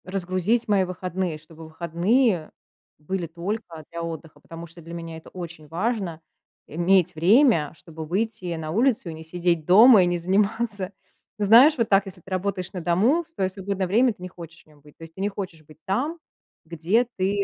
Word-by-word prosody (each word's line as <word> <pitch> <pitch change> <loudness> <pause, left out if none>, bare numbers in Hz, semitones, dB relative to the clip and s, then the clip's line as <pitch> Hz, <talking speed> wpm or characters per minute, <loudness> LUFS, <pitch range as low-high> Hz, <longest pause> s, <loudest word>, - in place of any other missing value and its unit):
Разгрузить 185 +5 -1
мои 200 -3 +3
выходные, 185 -2 -3
чтобы 160 +1 -14
выходные 170 +4 0 0.5
были 170 +3 -4
только 170 0 -5
для 170 0 -5
отдыха, 160 -2 -7
потому 165 +3 -10
что 170 +1 -15
для 165 +1 -10
меня 165 -1 -7
это 160 - -13
очень 170 -4 -9
важно 185 -1 -2 0.5
иметь 175 +3 +2
время, 185 - +4
чтобы 160 -1 -9
выйти 190 0 -2
на 155 -1 -5
улицу 225 -1 +1
и - - -6
не 160 0 -9
сидеть 170 -1 -1
дома 210 +3 +8
и - - +3
не 175 0 0
заниматься. 200 +2 0 0.5
Знаешь, 230 +9 +6
вот 230 -2 0
так, 195 0 +4
если 185 -2 -11
ты 190 - -15
работаешь 185 -1 -2
на 180 - -5
дому, 210 - +2
в 330 - -30
своё 195 - -2
свободное 195 0 -3
время 235 +6 +3
ты 190 - -23
не 180 - -5
хочешь 170 -2 -12
в - - -36
нем 150 -1 -22
быть, 150 0 -19
то - - -12
есть 165 0 -12
ты 190 - -7
не 200 - +1
хочешь 185 -6 -7
быть 155 0 -18
там, 255 - -1 0.5
где 170 +9 +1
ты 200 +2 0
180 Hz, 195 wpm, -24 LUFS, 165-205 Hz, 0.5 s, дома